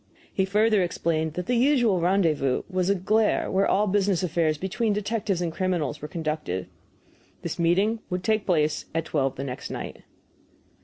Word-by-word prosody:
He 190 Hz, -, +1 dB
further 210 Hz, +1 st, +3 dB
explained 160 Hz, -3 st, -1 dB
that 180 Hz, -, -3 dB
the 250 Hz, -, 0 dB
usual 240 Hz, -6 st, +3 dB
rendezvous 165 Hz, -7 st, +1 dB
was 185 Hz, -1 st, -1 dB
a 200 Hz, -, +3 dB
place 215 Hz, +4 st, +1 dB
where 195 Hz, +1 st, +2 dB
all 205 Hz, +2 st, +3 dB
business 195 Hz, -2 st, +1 dB
affairs 165 Hz, -3 st, +1 dB
between 205 Hz, +5 st, -1 dB
detectives 205 Hz, -3 st, -1 dB
and 165 Hz, -2 st, -2 dB
criminals 175 Hz, -6 st, -1 dB
were 150 Hz, -, -5 dB
conducted. 155 Hz, -, -3 dB, 0.8 s
This -, -, -4 dB
meeting 195 Hz, +7 st, +2 dB
would 180 Hz, 0 st, -3 dB
take 215 Hz, 0 st, 0 dB
place 155 Hz, -4 st, +1 dB
at 165 Hz, 0 st, 0 dB
twelve 135 Hz, -4 st, 0 dB
the 135 Hz, -, -5 dB
next 130 Hz, -2 st, -6 dB
night. -, -, -6 dB
180 Hz, 165 wpm, -25 LUFS, 160-205 Hz, 0.8 s, further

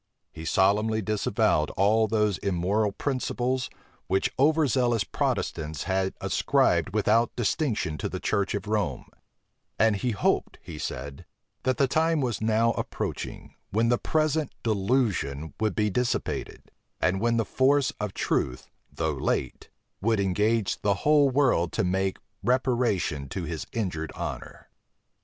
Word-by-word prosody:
He 80 Hz, 0 st, -9 dB
solemnly 105 Hz, +5 st, +2 dB
disavowed 100 Hz, -7 st, +1 dB
all 110 Hz, +3 st, +4 dB
those 105 Hz, -2 st, +1 dB
immoral 100 Hz, +3 st, 0 dB
principles, 130 Hz, +1 st, -1 dB, 0.4 s
which 95 Hz, +1 st, +1 dB
over 155 Hz, +3 st, +4 dB
zealous 120 Hz, -4 st, +2 dB
Protestants 80 Hz, -3 st, -2 dB
had 95 Hz, 0 st, -1 dB
ascribed 95 Hz, -, +1 dB
without 110 Hz, +2 st, +2 dB
distinction 110 Hz, -, -1 dB
to -, -, -2 dB
the -, -, -4 dB
church 100 Hz, -2 st, 0 dB
of 100 Hz, -, -4 dB
Rome: 105 Hz, -3 st, -1 dB, 0.7 s
and 110 Hz, -1 st, +4 dB
he 125 Hz, +5 st, -1 dB
hoped, 105 Hz, -, 0 dB
he 80 Hz, -3 st, -9 dB
said, 70 Hz, +1 st, -6 dB, 0.3 s
that 130 Hz, -1 st, 0 dB
the 135 Hz, -, +3 dB
time 160 Hz, +4 st, +2 dB
was 120 Hz, -7 st, -1 dB
now 110 Hz, +1 st, +3 dB
approaching, -, -, -5 dB, 0.2 s
when 115 Hz, +3 st, +1 dB
the 120 Hz, -, +2 dB
present 155 Hz, -2 st, 0 dB
delusion 100 Hz, -, 0 dB
would 110 Hz, -4 st, 0 dB
be 105 Hz, -1 st, +1 dB
dissipated; 125 Hz, +3 st, -2 dB, 0.3 s
and 95 Hz, +1 st, +1 dB
when 115 Hz, 0 st, +2 dB
the 115 Hz, -, +1 dB
force 135 Hz, +1 st, +2 dB
of 105 Hz, -2 st, -4 dB
truth, 65 Hz, 0 st, -1 dB, 0.3 s
though -, -, -1 dB
late, 65 Hz, -, -2 dB, 0.3 s
would 110 Hz, +1 st, +2 dB
engage 105 Hz, +2 st, +1 dB
the 100 Hz, -1 st, 0 dB
whole 145 Hz, -2 st, +5 dB
world 125 Hz, -11 st, +2 dB
to -, -, +1 dB
make 95 Hz, +1 st, 0 dB, 0.3 s
reparation 120 Hz, -, +1 dB
to 95 Hz, -, -4 dB
his 80 Hz, -1 st, -5 dB
injured 85 Hz, -8 st, -3 dB
honor. -, -, -7 dB
110 Hz, 140 wpm, -27 LUFS, 95-125 Hz, 0.7 s, whole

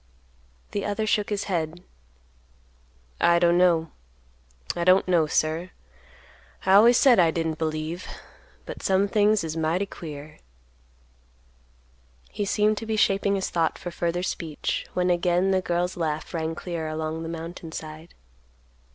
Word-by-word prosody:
The 205 Hz, -, -2 dB
other 210 Hz, +1 st, -1 dB
shook 210 Hz, -1 st, +1 dB
his 205 Hz, -1 st, -1 dB
head; 170 Hz, -2 st, -3 dB, 1.4 s
"I 170 Hz, 0 st, +4 dB
don't 170 Hz, 0 st, +4 dB, 1.2 s
know—I 170 Hz, -, -1 dB
don't 185 Hz, +2 st, +4 dB
know, 170 Hz, -4 st, +3 dB
sir; 160 Hz, +4 st, 0 dB, 1.0 s
I 190 Hz, -, +4 dB
always 230 Hz, +4 st, +7 dB
said 255 Hz, -6 st, +5 dB
I 170 Hz, -2 st, +5 dB
didn't 160 Hz, -1 st, -2 dB
believe, 155 Hz, +2 st, -3 dB, 0.6 s
but -, -, -8 dB
some 195 Hz, +1 st, +2 dB
things 210 Hz, -1 st, +2 dB
is 160 Hz, -1 st, -4 dB
mighty 165 Hz, +4 st, 0 dB
queer." 150 Hz, -5 st, -9 dB, 1.9 s
He 205 Hz, -, -3 dB
seemed 210 Hz, +1 st, +1 dB
to 225 Hz, -, -8 dB
be 220 Hz, -, -1 dB
shaping 200 Hz, -1 st, +2 dB
his 190 Hz, -, -2 dB
thought 165 Hz, -2 st, 0 dB
for 175 Hz, -, -7 dB
further 170 Hz, +1 st, -2 dB
speech, 160 Hz, -4 st, -3 dB
when 180 Hz, 0 st, +2 dB
again 175 Hz, +2 st, +2 dB
the 190 Hz, -1 st, +2 dB
girl's 175 Hz, 0 st, -1 dB
laugh 155 Hz, -3 st, -3 dB
rang 160 Hz, -1 st, -2 dB
clear 170 Hz, -2 st, -4 dB
along 155 Hz, +1 st, -3 dB
the 165 Hz, -, -5 dB
mountain 165 Hz, 0 st, -7 dB
side. 155 Hz, +1 st, -9 dB
175 Hz, 140 wpm, -25 LUFS, 160-195 Hz, 1.9 s, always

